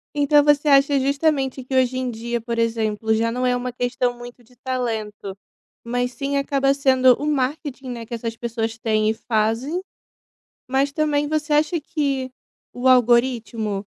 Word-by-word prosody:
Então 290 Hz, 0 st, +4 dB
você 295 Hz, 0 st, +3 dB
acha 275 Hz, 0 st, +5 dB
justamente 275 Hz, -1 st, 0 dB
que 260 Hz, +1 st, -4 dB
hoje 255 Hz, 0 st, +2 dB
em 255 Hz, -1 st, -2 dB
dia, 235 Hz, +1 st, -3 dB
por 230 Hz, 0 st, -3 dB
exemplo, 220 Hz, -1 st, 0 dB
já 230 Hz, +1 st, 0 dB
não 250 Hz, +1 st, -2 dB
é 250 Hz, -, +2 dB
uma 245 Hz, 0 st, -3 dB
questão 245 Hz, 0 st, -1 dB
muito 245 Hz, 0 st, -11 dB
de 250 Hz, +2 st, -24 dB
talento, 220 Hz, -6 st, -4 dB, 0.5 s
mas 245 Hz, +1 st, -2 dB
sim 280 Hz, -1 st, -2 dB
acaba 275 Hz, 0 st, +1 dB
sendo 260 Hz, -2 st, +4 dB
marketing, 275 Hz, -1 st, -2 dB
né. 235 Hz, -2 st, -6 dB
Que 235 Hz, -, -10 dB
essas 230 Hz, 0 st, -4 dB
pessoas 225 Hz, -1 st, -3 dB
têm 215 Hz, -1 st, +1 dB
e -, -, +1 dB
fazem, 225 Hz, +10 st, -1 dB, 0.9 s
mas 275 Hz, +2 st, +1 dB
também 295 Hz, -2 st, 0 dB
você 305 Hz, 0 st, -1 dB
acha 310 Hz, +3 st, +2 dB
que 280 Hz, -5 st, -2 dB, 0.4 s
o 245 Hz, +1 st, -4 dB
algoritmo 235 Hz, -4 st, +2 dB
255 Hz, 160 wpm, -22 LUFS, 230-280 Hz, 0.9 s, acha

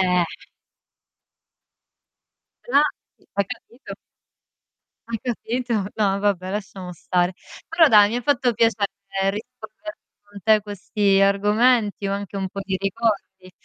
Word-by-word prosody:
Eh. 180 Hz, -2 st, +1 dB, 2.3 s
Ah, 280 Hz, +4 st, +5 dB, 0.5 s
hai 200 Hz, -1 st, +2 dB
capito? 240 Hz, +6 st, -9 dB, 1.1 s
Hai 230 Hz, -1 st, -3 dB
capito? 245 Hz, 0 st, -3 dB, 0.2 s
No, 200 Hz, -2 st, +1 dB
vabbè 195 Hz, -2 st, 0 dB
lasciamo 195 Hz, -3 st, -5 dB
stare. 180 Hz, +2 st, 0 dB, 0.3 s
Però 325 Hz, -1 st, +5 dB
dai 210 Hz, -4 st, +7 dB
mi 235 Hz, -, -2 dB
ha -, -, -3 dB
fatto 250 Hz, -2 st, +2 dB
piacere 225 Hz, -2 st, +2 dB, 0.4 s
rispondere 250 Hz, +8 st, -9 dB, 0.2 s
con 205 Hz, 0 st, -13 dB
te 220 Hz, -, +4 dB
a 215 Hz, -, +3 dB
questi 205 Hz, 0 st, 0 dB
argomenti 205 Hz, +1 st, +3 dB
o 195 Hz, -, -1 dB
anche 200 Hz, 0 st, -5 dB
un 190 Hz, -, -2 dB
po' 195 Hz, -, -6 dB
di 190 Hz, -1 st, -2 dB
ricordi. 195 Hz, -2 st, -2 dB
205 Hz, 125 wpm, -23 LUFS, 195-235 Hz, 2.3 s, dai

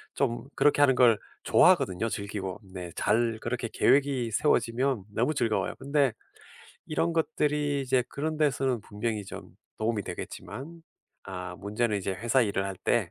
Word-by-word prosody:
좀 130 Hz, -2 st, -1 dB
그렇게 145 Hz, 0 st, +3 dB
하는 135 Hz, -3 st, +5 dB
걸 120 Hz, -4 st, +5 dB, 0.3 s
좋아하거든요, 125 Hz, -, +4 dB
즐기고. 100 Hz, -3 st, -4 dB
네. 90 Hz, -2 st, -6 dB
잘 115 Hz, +1 st, +1 dB
그렇게 120 Hz, 0 st, -2 dB
계획이 135 Hz, -5 st, +2 dB
세워지면 125 Hz, -3 st, +1 dB
너무 120 Hz, +8 st, +1 dB
즐거워요. 115 Hz, -7 st, 0 dB
근데 140 Hz, -1 st, +2 dB, 0.8 s
이런 165 Hz, +2 st, 0 dB
것들이 150 Hz, -3 st, 0 dB
이제 130 Hz, -1 st, +2 dB
그런 155 Hz, +2 st, -3 dB
데서는 135 Hz, -5 st, +1 dB
분명히 105 Hz, 0 st, -3 dB
좀 -, -, -9 dB, 0.3 s
도움이 110 Hz, -1 st, 0 dB
되겠지만 165 Hz, -, -8 dB, 0.4 s
아 90 Hz, -2 st, -6 dB
문제는 105 Hz, +1 st, -1 dB
이제 95 Hz, 0 st, -2 dB
회사 120 Hz, +7 st, +2 dB
일을 100 Hz, -2 st, 0 dB
할 95 Hz, -1 st, -5 dB
때 100 Hz, -3 st, 0 dB
120 Hz, 325 characters per minute, -28 LUFS, 105-140 Hz, 0.8 s, 하는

